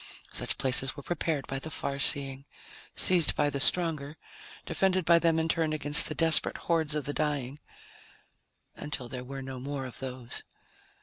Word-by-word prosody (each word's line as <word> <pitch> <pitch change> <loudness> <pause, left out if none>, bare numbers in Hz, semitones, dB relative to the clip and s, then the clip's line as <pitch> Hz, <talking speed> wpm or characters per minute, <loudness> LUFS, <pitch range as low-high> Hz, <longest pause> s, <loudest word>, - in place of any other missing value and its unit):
Such - - -1
places 135 +1 +1
were 140 - -9
prepared 160 -4 -3
by 135 - -5
the 160 - -9
far 140 -2 -5
seeing, 135 -1 +3 0.5
seized 175 -4 +3
by 145 0 0
the 140 - -4
stronger, 155 -2 +2 0.5
defended 185 -2 -1
by 170 0 +4
them 165 -1 +1
in 160 0 -1
turn 160 -1 -1
against 150 +1 +6
the - - -5
desperate 165 -1 +5
hordes 160 -3 -2
of 150 -3 -4
the 145 - -4
dying... 145 -3 -3 1.2
until 140 -4 -5
there 125 +1 -8
were 135 +1 -9
no 130 -1 -8
more 135 +1 -6
of 125 -3 -11
those. 125 -2 -7
145 Hz, 170 wpm, -27 LUFS, 135-160 Hz, 1.2 s, against